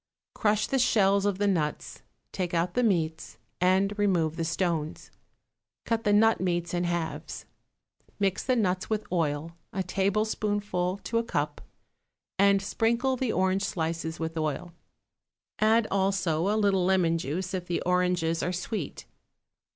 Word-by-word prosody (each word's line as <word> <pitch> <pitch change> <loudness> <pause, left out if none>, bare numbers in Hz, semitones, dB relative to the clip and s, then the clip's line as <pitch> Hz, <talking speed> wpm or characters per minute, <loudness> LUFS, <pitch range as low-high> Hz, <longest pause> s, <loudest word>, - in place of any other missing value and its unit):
Crush 210 -1 +1
the 270 - 0
shells 200 -4 +3
of 200 -2 0
the 205 - 0
nuts, 165 -7 -1 0.3
take 180 -2 -2
out 170 +1 0
the 250 - +2
meats, 165 -8 0 0.2
and 190 +2 +3
remove 175 -6 +2
the 165 - -2
stones; 160 -1 -2 0.7
cut 230 -1 -1
the 205 - +3
nut 220 +1 +4
meats 175 -2 -1
in 175 0 0
halves. 170 -2 -3 0.7
Mix 195 -2 0
the 255 - +1
nuts 190 -5 0
with 215 -1 -1
oil, 160 -2 -1 0.2
a 190 - -2
tablespoonful 200 -1 0
to 230 - -1
a - - -1
cup, 150 -9 -2 0.8
and 200 0 +4
sprinkle 235 +6 +1
the 255 -2 -1
orange 190 +1 +1
slices 160 -2 -3
with 160 0 -3
oil; 155 +3 -3 0.9
add 220 +1 +4
also 190 -4 +1
a 210 +2 +2
little 200 -3 +2
lemon 175 -3 +2
juice 175 +6 -3
if 180 -2 -3
the 175 - -1
oranges 180 -2 +1
are 180 - -1
sweet. 180 -2 -4
185 Hz, 145 wpm, -28 LUFS, 170-205 Hz, 0.9 s, nut